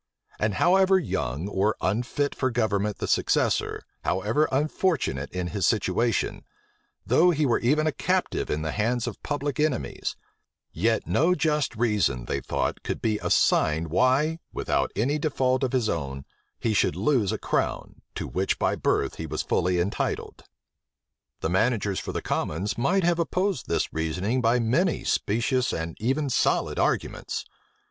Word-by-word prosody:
And 105 -2 0
however 190 - +4
young 75 - -2
or 105 +1 +1
unfit 120 +8 -1
for 130 - 0
government 105 -3 0
the - - -3
successor, - - +1 0.2
however 105 +12 +1
unfortunate 140 - 0
in 90 -1 -3
his 100 -3 0
situation, 110 +1 0 0.6
though 180 +2 +4
he 155 -3 +2
were 120 - +2
even 150 +6 +2
a 155 - +2
captive - - -1
in 75 +1 -1
the 80 - -2
hands 115 +3 0
of - - -6
public 145 0 -3
enemies, 150 -4 -1 0.6
yet 110 +6 0
no 175 +4 +2
just 150 -5 0
reason, 105 - +1
they 70 - -2
thought, - - -2
could - - -3
be 110 -2 0
assigned 80 +2 +2
why, 130 - +2
without - - -1
any 140 +8 +1
default 130 -4 +1
of 130 - 0
his 125 -4 +1
own, 70 -7 -3 0.3
he 115 - 0
should 105 - +2
lose 125 -10 +1
a - - -1
crown, - - -2
to - - -4
which 95 +1 -1
by - - +1
birth - - 0
he 80 - -5
was 75 +1 -3
fully 90 +1 +1
entitled. 90 +4 -2 1.0
The 80 - -1
managers 100 0 +1
for - - -5
the - - -4
commons 95 +7 -2
might 180 +11 +1
have 170 0 +2
opposed 185 -1 -1
this - - -1
reasoning 90 +10 -1
by 115 +1 +3
many 130 +10 +1
specious 120 +4 +1
and 80 0 -4
even 135 +5 0
solid - - +1
arguments. - - -1
115 Hz, 155 wpm, -26 LUFS, 95-145 Hz, 1.0 s, however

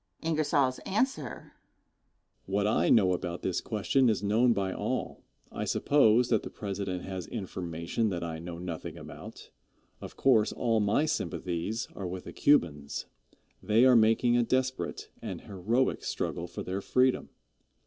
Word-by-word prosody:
Answer. 155 - 0 0.9
What 100 +1 0
I 105 - +2
know 95 -5 +5
about 90 -1 -4
this 95 - -1
question 120 +4 +1
is 105 -2 0
known 115 +5 +3
by 95 -4 0
all. - - -3 0.3
I - - -4
suppose 125 -4 +3
that 110 -3 +3
the - - -7
President 100 -3 -4
has 95 -2 -5
information 95 0 -3
that 85 -3 -3
I 80 -1 -4
know 85 0 -7
nothing 85 -2 -6
about. - - -11 0.5
Of - - -9
course, 115 -6 +4
all 115 -2 +1
my 105 +8 +2
sympathies 105 - -2
are 95 - -4
with 90 0 -6
the - - -9
Cubans. 75 - +1 0.6
They 110 +4 +4
are 130 -1 +7
making 115 +2 +4
a 120 - +4
desperate 130 +2 -2
an - - -5
heroic 110 +7 -1
struggle 85 - -3
for 85 - -6
their 95 +2 -3
freedom. 130 +5 +2
105 Hz, 145 wpm, -29 LUFS, 90-125 Hz, 0.9 s, are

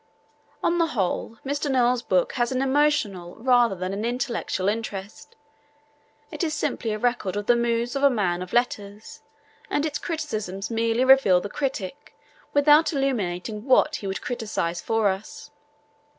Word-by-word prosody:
On 345 +1 +2
the 335 - +3
whole, 200 +4 -1
Mr. 285 +1 -2
Noel's 250 -2 +2
book 185 -6 +1
has 240 -1 0
an 255 - 0
emotional 265 -11 +1
rather 245 -3 +3
than 185 +1 -4
an 205 +2 -3
intellectual 240 -5 -2
interest. 205 -2 -4 1.0
It - - -4
is 310 -2 -1
simply 230 -6 -2
a 215 - -2
record 240 -4 -1
of 205 0 -3
the 240 - +4
moods 235 +1 0
of 275 - -1
a 280 - +6
man 185 -8 0
of 180 - -7
letters, 210 -4 -2 0.5
and 290 - 0
its 300 -1 -2
criticisms 215 - -4
merely 230 +2 +1
reveal 265 -9 +6
the 200 - -6
critic 270 -1 -4 0.4
without 295 +2 +5
illuminating 215 - -2
what 295 +3 +3
he 200 - -6
would 190 - -3
criticise 210 -8 -3
for 225 -2 +1
us. 190 +2 -6
230 Hz, 155 wpm, -24 LUFS, 200-270 Hz, 1.0 s, a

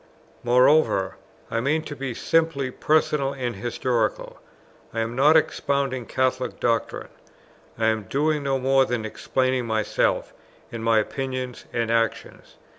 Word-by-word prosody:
Moreover, 125 -4 +3 0.3
I 115 - 0
mean 150 +6 0
to 145 - -7
be 135 -3 -5
simply 160 -5 +1
personal 150 -1 +1
and 125 -4 -3
historical: 120 0 -2 0.6
I 115 - 0
am 115 +1 -3
not 150 +5 +6
expounding 140 -5 -1
Catholic 130 0 -1
doctrine, 115 -1 -1 0.7
I 115 - 0
am 110 -2 +1
doing 150 +7 0
no 135 -1 0
more 135 +1 +3
than 120 -4 -2
explaining 130 +2 -1
myself, 110 -1 0 0.4
and 115 -1 -6
my 115 -1 +3
opinions 130 +2 -3
and 115 -1 -1
actions. 115 -1 -2
130 Hz, 130 wpm, -24 LUFS, 115-140 Hz, 0.7 s, not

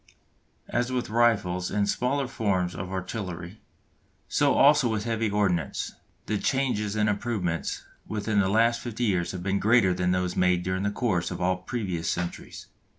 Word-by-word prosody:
As 120 +1 -1
with 125 -4 -2
rifles 100 -6 +2
and 105 -1 +1
the - - -5
smaller 135 +2 0
forms 95 -7 0
of 95 -1 -6
artillery, 95 -1 -5 0.7
so - - +2
also 145 -2 +5
with 110 -2 -1
heavy 115 -1 0
ordnance, 100 -5 0 0.3
the 105 -1 -1
changes 125 -7 0
and 105 0 +2
improvements 100 -5 -2 0.2
within 105 0 0
the 95 -2 +2
last 115 +3 +3
fifty 120 -1 -4
years 95 -6 +1
have 90 -1 -6
been 100 +1 0
greater 110 -4 +4
than 90 0 0
those 90 0 0
made 90 -1 +2
during 95 +1 -1
the 100 - +1
course 100 -5 0
of 90 - -5
all 90 +1 +1
the - - -20
previous 90 -7 -3
centuries. 90 0 -4
100 Hz, 170 wpm, -27 LUFS, 90-115 Hz, 0.7 s, also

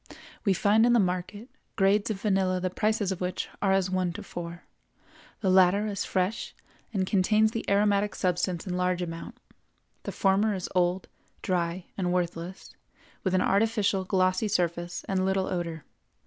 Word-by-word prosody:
We 200 - +3
find 210 +4 +4
in 240 0 +5
the 240 - +5
market, 185 +4 -2 0.3
grades 200 +1 +3
of 210 -3 -2
vanilla 190 -3 +1
the 185 0 -2
prices 210 -1 0
of 185 - -4
which 180 0 -3
are 195 - +2
as 190 -1 +2
one 185 -2 0
to 205 +3 -7
four; 170 -2 -7 0.8
the 195 - +1
latter 190 +2 +5
is 200 -2 -2
fresh 190 +4 -2 0.4
and 195 -4 0
contains 215 +3 +3
the 230 - -3
aromatic 205 0 +2
substance 180 -1 -1
in 180 -2 -3
large 180 0 0
amount; 165 -1 -7 0.6
the - - -5
former 200 +2 +2
is 185 - -4
old, 180 0 +1 0.4
dry, 175 0 -1
and 180 -2 0
worthless, 175 0 -3 0.5
with 190 -1 +1
an 185 - +3
artificial 200 -1 +2
glossy 185 +2 +1
surface 175 -3 -1
and 190 -1 0
little 190 0 +1
odor. 170 -5 -4
190 Hz, 160 wpm, -27 LUFS, 180-205 Hz, 0.8 s, in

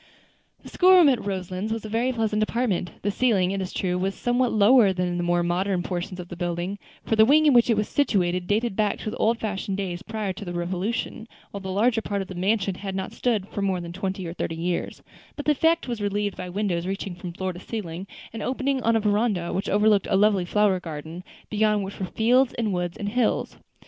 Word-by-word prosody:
The - - -10
school 370 +1 +5
room 350 -5 +7
at 255 -4 +1
Roselands 190 +1 -3
was 225 -1 -3
a - - -4
very 230 +4 0
pleasant 220 -3 0
apartment; 215 -5 0
the 205 - +1
ceiling, 200 -6 +2
it 195 0 -2
is 185 - -4
true, 180 -1 -1
was 195 +1 -1
somewhat 245 0 +1
lower 215 0 +5
than 180 -1 -1
in 175 0 -2
the - - -1
more 175 0 +2
modern 180 +1 0
portion 180 +1 -4
of 175 - -7
the 175 - -7
building, 175 +3 -3 0.3
for 225 - +1
the 220 - +7
wing 300 +6 +5
in 295 - +6
which 240 0 +5
it 225 - +3
was 210 - 0
situated 180 -9 +1
dated 215 0 0
back 210 -1 +1
to 215 - -5
the - - -6
old 230 +2 +2
fashioned 200 -3 -3
days 180 -3 -3
prior 215 -3 -3
to 190 - -8
the 175 -2 -5
Revolution, 185 +6 -3 0.2
while 200 - -6
the 190 - -6
larger 225 +4 +2
part 200 -2 -2
of 190 - -14
the - - -6
mansion 195 +2 0
had 190 +1 -6
not 190 0 -4
stood 225 -6 0
more 195 -2 0
than 170 -1 -7
twenty 190 0 -3
or 165 - -5
thirty 165 -2 -3
years; 170 +1 -3 0.3
but 290 - -6
the 300 - +4
effect 325 +2 +2
was 235 -3 -3
relieved 205 0 -1
by 180 - -6
windows 180 -2 -1
reaching 195 -1 -3
from 175 0 -7
floor 185 +2 -3
to 175 - -9
ceiling, 190 -3 -6 0.3
and 225 - -5
opening 265 +2 -1
on 230 0 +2
a - - +4
veranda 205 -4 0
which 195 +2 -2
overlooked 210 -1 +3
a 200 - +2
lovely 200 -3 +3
flower 200 0 +2
garden, 165 +1 -7 0.3
beyond 210 -1 +2
which 195 +1 -7
were 190 - -2
fields 245 +6 +2
and 220 -4 -1
woods 175 -1 -2
and 205 - -3
hills. 240 +1 0
200 Hz, 235 wpm, -25 LUFS, 180-225 Hz, 0.3 s, room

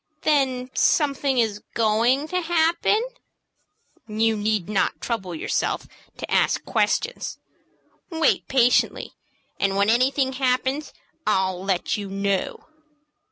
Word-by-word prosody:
"Then 260 -4 +1
something 280 -3 +2
is 215 -3 0
going 230 +6 +2
to 365 0 0
happen?" 340 +5 +2 1.0
"You 220 +1 +1
need 210 -3 -1
not 210 -2 0
trouble 190 -7 -4
yourself - - -1 0.3
to - - -7
ask - - +2
questions. 475 +2 -1 0.7
Wait 325 -2 +1
patiently, 250 -2 +2 0.5
and 195 -1 +1
when 200 +2 +3
anything 265 +2 +2
happens 260 +2 -1 0.4
I'll 190 -3 +1
let 190 0 0
you 200 -2 -6
know." 195 0 -2
240 Hz, 110 wpm, -23 LUFS, 205-280 Hz, 1.0 s, when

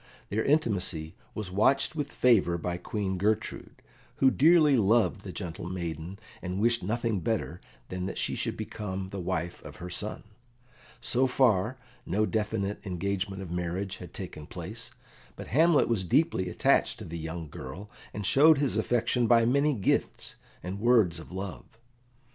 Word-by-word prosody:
Their 110 +2 0
intimacy 95 - +1 0.2
was 105 -4 -4
watched 135 +10 +3
with 145 -2 -3
favour 100 -9 +3
by 90 +1 -3
Queen 95 0 -3
Gertrude, 110 +2 -2 0.3
who 135 -1 +4
dearly 155 0 +5
loved 110 -1 +3
the 100 - -7
gentle 85 -1 -6
maiden, 85 0 -5 0.2
and 90 +1 -3
wished 115 +2 +2
nothing 115 +1 -1
better 85 - -2 0.3
than 90 0 -3
that - - -5
she - - -1
should - - -3
become 95 -2 -5
the 100 - -5
wife 85 -1 -3
of - - -10
her 90 +1 -8
son. 105 +4 -4 0.8
So 130 +2 +2
far, 125 -2 +2 0.3
no 105 +5 +1
definite 105 -2 -2
engagement 95 +1 -3
of 85 - -8
marriage 90 +3 -3
had 90 -3 -10
taken 75 -1 -8
place, - - -7 0.5
but - - -9
Hamlet 160 +4 +4
was 115 -5 0
deeply 95 - +2
attached - - +2
to - - -8
the 85 +1 -6
young 80 0 -5
girl, 95 +7 -8 0.2
and 105 -1 -5
showed 150 +7 +6
his 140 -6 +1
affection 120 +2 +1
by 115 -1 +5
many 140 +4 +3
gifts 100 - -1 0.3
and 95 +3 -5
words 110 -8 +3
of 80 - -11
love. 95 +3 -7
100 Hz, 160 wpm, -29 LUFS, 90-120 Hz, 0.8 s, showed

